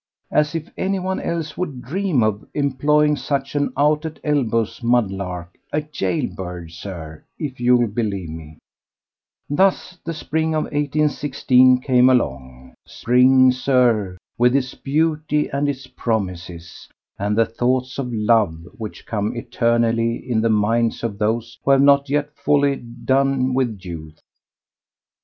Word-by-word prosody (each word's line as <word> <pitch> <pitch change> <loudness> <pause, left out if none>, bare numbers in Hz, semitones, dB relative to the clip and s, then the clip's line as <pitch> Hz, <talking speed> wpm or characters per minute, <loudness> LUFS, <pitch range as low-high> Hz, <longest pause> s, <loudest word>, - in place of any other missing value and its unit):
As 150 +1 +1
if 165 0 -3
anyone 190 -1 -1
else 165 -3 -3
would 140 -9 -4
dream 165 - 0
of 105 -1 0
employing 150 +2 +2
such 135 0 -3
an 145 -1 0
out 150 +2 +3
at 160 -1 -6
elbows 120 -8 0
mudlark—a 95 - -2
jail 95 -8 -1
bird, 90 -3 -7
Sir, 85 -3 -8
if 140 -6 -5
you'll 120 0 +4
believe 100 -6 -3
me. 80 -1 -10 0.9
Thus 185 +3 +1
the 165 - -4
Spring 160 +1 -1
of 155 - +1
1816 145 -3 +2
came 125 -1 +4
along. 65 - -1
Spring, 130 +1 +4
Sir, 125 -7 +1 0.2
with 125 +2 +4
its 130 -2 0
beauty 150 +1 0
and 140 +1 0
its 130 -2 -4
promises, 90 -9 -4 0.3
and 105 +2 -1
the 115 - +5
thoughts 125 +3 -1
of 125 -3 -3
love 105 -7 +1
which 110 -2 -7
come 105 +2 -2
eternally 115 0 +1
in 120 -3 -2
the 115 - +1
minds 115 +2 +1
of 105 -3 -3
those 115 +2 -1
who - - -2
have 135 0 +6
not 140 0 +4
yet 145 +1 0
wholly 145 -1 +3
done 130 +2 0
with 125 -6 -1
youth. 80 -3 -8
125 Hz, 135 wpm, -21 LUFS, 105-145 Hz, 0.9 s, have